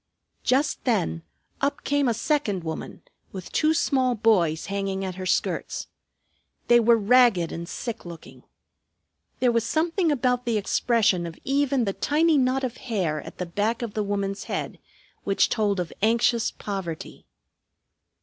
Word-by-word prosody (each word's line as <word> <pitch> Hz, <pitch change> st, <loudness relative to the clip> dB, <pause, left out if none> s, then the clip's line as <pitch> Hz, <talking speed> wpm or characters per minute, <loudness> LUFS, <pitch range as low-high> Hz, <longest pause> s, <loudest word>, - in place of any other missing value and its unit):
Just 275 Hz, +3 st, +1 dB
then 195 Hz, -9 st, 0 dB, 0.4 s
up 280 Hz, +1 st, -1 dB
came 285 Hz, -1 st, +1 dB
a 235 Hz, -, +1 dB
second 230 Hz, -, 0 dB
woman 160 Hz, -1 st, -6 dB, 0.3 s
with 185 Hz, -3 st, -8 dB
two 310 Hz, 0 st, +2 dB
small 260 Hz, -6 st, +2 dB
boys 185 Hz, -8 st, +2 dB
hanging 195 Hz, -1 st, -2 dB
at 185 Hz, -, -4 dB
her 185 Hz, +1 st, -6 dB
skirts. -, -, -1 dB, 0.8 s
They 240 Hz, 0 st, +7 dB
were 235 Hz, 0 st, +5 dB
ragged 220 Hz, -5 st, +4 dB
and 170 Hz, +1 st, -6 dB
sick 235 Hz, -3 st, -5 dB
looking. 170 Hz, -2 st, -11 dB, 1.0 s
There 250 Hz, -2 st, +4 dB
was 230 Hz, -1 st, +1 dB
something 330 Hz, -, +1 dB
about 250 Hz, -2 st, 0 dB
the 230 Hz, -2 st, +1 dB
expression 205 Hz, -4 st, +1 dB
of 165 Hz, -, -9 dB
even 275 Hz, -2 st, +1 dB
the 195 Hz, -, -1 dB
tiny 310 Hz, +4 st, +2 dB
knot 260 Hz, +1 st, +1 dB
of 255 Hz, -1 st, -3 dB
hair 185 Hz, -, -2 dB
at -, -, -11 dB
the 180 Hz, -, -3 dB
back 210 Hz, +7 st, -1 dB
of 225 Hz, -3 st, -5 dB
the 215 Hz, -, -1 dB
woman's 200 Hz, -1 st, -2 dB
head -, -, -4 dB, 0.4 s
which 195 Hz, -, +2 dB
told 205 Hz, -4 st, 0 dB
of 175 Hz, -2 st, -4 dB
anxious 230 Hz, +1 st, +2 dB
poverty. 190 Hz, -6 st, -6 dB
225 Hz, 150 wpm, -25 LUFS, 190-255 Hz, 1.0 s, They